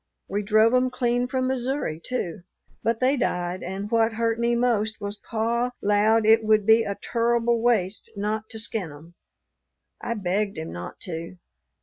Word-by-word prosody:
We 205 +1 -1
drove 215 +3 +4
'em 255 0 +3
clean 245 -1 0
from 255 0 -1
Missouri, 255 - -2
too. 180 -10 -3 0.4
But 230 0 0
they 260 +2 +3
died, 180 -5 -1
and 195 +3 -5
what 225 0 +3
hurt 230 0 0
me 235 0 +2
most 225 -3 +1
was, 205 0 -5
pa 235 +3 -1
'lowed 210 +2 +3
it 225 +1 +5
would 215 -1 +3
be 225 +1 +6
a 200 -3 -2
turrible 235 0 +1
waste 220 -5 +1
not 215 +2 -2
to 225 - -6
skin 215 -6 -3
'em. 155 +4 -14 0.9
I 235 - -2
begged 200 +1 -1
him 80 +1 -5
not 85 +1 -8
to. 170 0 -6
220 Hz, 165 wpm, -25 LUFS, 200-235 Hz, 0.9 s, be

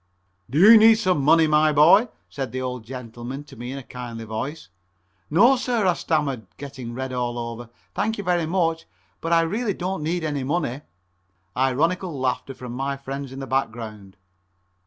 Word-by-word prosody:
"Do 135 - -2
you 215 +7 +9
need 225 +1 +7
some 185 -8 +1
money, 160 +3 +5
my 155 0 +4
boy?" 170 +10 +6 0.2
said 135 -4 -5
the 130 - -4
old 125 -2 -4
gentleman 125 +2 -7
to 145 - -15
me 120 +2 -7
in 135 - -5
a 135 - -7
kindly 120 -2 -8
voice. 135 +9 -5 0.6
"No, 230 - +5
sir," 240 -4 0
I 180 - +4
stammered, 140 - -1
getting 130 -4 -8
red 130 0 -4
all 120 -1 -2
over, 115 0 -6 0.2
"thank 220 +2 -1
you 205 - -4
very 175 -3 +1
much, 165 -2 0 0.3
but 165 - -3
I 165 0 +5
really 205 +5 -1
don't 185 -1 -3
need 165 +3 -2
any 145 -3 -2
money." 145 -2 -2 0.7
Ironical 155 +6 0
laughter 130 +1 -2
from 125 -1 -8
my 135 +2 -2
friends 135 0 -6
in 135 - -9
the - - -4
background. 110 -7 -4
140 Hz, 180 wpm, -23 LUFS, 125-170 Hz, 0.7 s, you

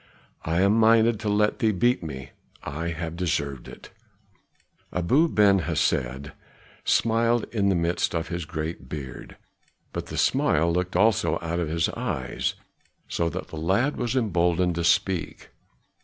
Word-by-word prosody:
I 85 +3 0
am 100 +2 +4
minded 115 0 +4
to 110 -1 -2
let 105 +3 +1
thee 110 -4 +3
beat 120 +6 +1
me. 70 -5 -7 0.3
I 75 +4 -4
have 85 0 -4
deserved 75 -7 -2
it." - - -12 1.0
Abu 125 - +2
Ben 100 -5 +4
Hesed 65 -4 -1 0.5
smiled 115 +1 +2
in 100 -4 +1
the 95 - +2
midst 85 +1 0
of 80 0 -2
his 85 -2 -4
great 80 0 -5
beard, 70 -4 -8 0.6
but - - -4
the - - -6
smile 85 +3 +2
looked 90 +1 -2
also 105 +2 +3
out 85 +1 -2
of 85 -3 -2
his 80 +1 +1
eyes, 65 -2 -3 0.5
so 85 -1 -1
that - - -6
the 80 - -8
lad 95 - +1
was 120 +1 -2
emboldened 90 -6 +1
to 85 0 -2
speak. 85 +1 0
85 Hz, 150 wpm, -25 LUFS, 80-105 Hz, 1.0 s, am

